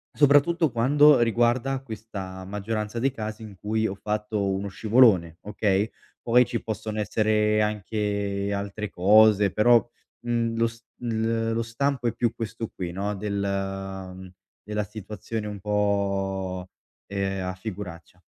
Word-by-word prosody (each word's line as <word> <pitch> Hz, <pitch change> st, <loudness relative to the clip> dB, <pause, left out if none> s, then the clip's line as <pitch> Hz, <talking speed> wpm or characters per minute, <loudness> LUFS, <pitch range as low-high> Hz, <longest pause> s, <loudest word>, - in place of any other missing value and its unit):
soprattutto 145 Hz, +2 st, +4 dB
quando 140 Hz, +4 st, +5 dB
riguarda 120 Hz, +3 st, +2 dB
questa 100 Hz, -6 st, -7 dB
maggioranza 105 Hz, +3 st, -3 dB
dei 135 Hz, +2 st, +1 dB
casi 110 Hz, -2 st, -6 dB
in 105 Hz, -3 st, -9 dB
cui 110 Hz, +1 st, -1 dB
ho 100 Hz, -, -2 dB
fatto 105 Hz, 0 st, -2 dB
uno 95 Hz, +1 st, -2 dB
scivolone, 100 Hz, -7 st, +3 dB
okay, 105 Hz, 0 st, 0 dB, 0.3 s
poi 125 Hz, +1 st, +4 dB
ci 115 Hz, -, -4 dB
possono 110 Hz, 0 st, -4 dB
essere 105 Hz, 0 st, +2 dB
anche 100 Hz, -1 st, -1 dB
altre 100 Hz, +1 st, -4 dB
cose, 105 Hz, +1 st, +5 dB
però, 115 Hz, +3 st, +5 dB, 0.4 s
mhmm, 115 Hz, -1 st, -1 dB, 0.5 s
il 115 Hz, -1 st, 0 dB
lo 115 Hz, 0 st, 0 dB
stampo 125 Hz, +2 st, -1 dB
è 115 Hz, -, 0 dB
più 120 Hz, -1 st, 0 dB
questo 115 Hz, 0 st, -5 dB
qui 90 Hz, -2 st, -4 dB
no, 100 Hz, +2 st, -2 dB
del 95 Hz, -2 st, -4 dB, 0.3 s
della 105 Hz, 0 st, -2 dB
situazione 105 Hz, +1 st, -6 dB
un 105 Hz, -1 st, -6 dB
po' 95 Hz, -2 st, -1 dB, 0.4 s
ehm, 95 Hz, -1 st, -2 dB
a 90 Hz, -, -3 dB
figuraccia. 90 Hz, -3 st, -8 dB
105 Hz, 130 wpm, -25 LUFS, 100-115 Hz, 0.5 s, quando